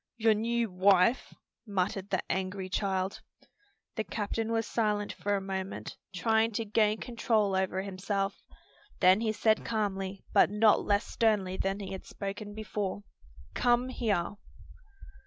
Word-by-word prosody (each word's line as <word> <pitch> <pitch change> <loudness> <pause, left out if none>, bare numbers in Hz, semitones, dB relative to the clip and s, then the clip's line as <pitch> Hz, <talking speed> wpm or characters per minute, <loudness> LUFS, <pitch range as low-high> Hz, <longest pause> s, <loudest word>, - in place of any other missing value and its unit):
"Your 225 -1 +4
new 230 0 0
wife," 190 +5 +3 0.4
muttered 195 0 -1
the 190 - 0
angry 190 0 -2
child. 190 -1 -1 0.8
The 220 - 0
captain 220 +3 -3
was 225 -1 +1
silent 210 -2 0
for 205 0 -1
a 195 - -1
moment, 190 0 -5 0.2
trying 220 +4 +2
to 225 +2 -2
gain 215 0 +2
control 225 -4 0
over 190 0 0
himself. 195 +1 -2 0.6
Then 185 +3 +5
he 220 -1 +1
said 215 0 +2
calmly, 195 -3 -2
but - - +6
not 210 +1 +4
less 205 +1 +2
sternly 210 -5 +1
than 195 +1 -1
he 195 -1 -6
had 190 - -7
spoken 205 +1 -6
before, 205 -2 -3 0.5
"Come 245 +1 +2
here." 210 -6 -1
205 Hz, 140 wpm, -30 LUFS, 190-220 Hz, 0.8 s, but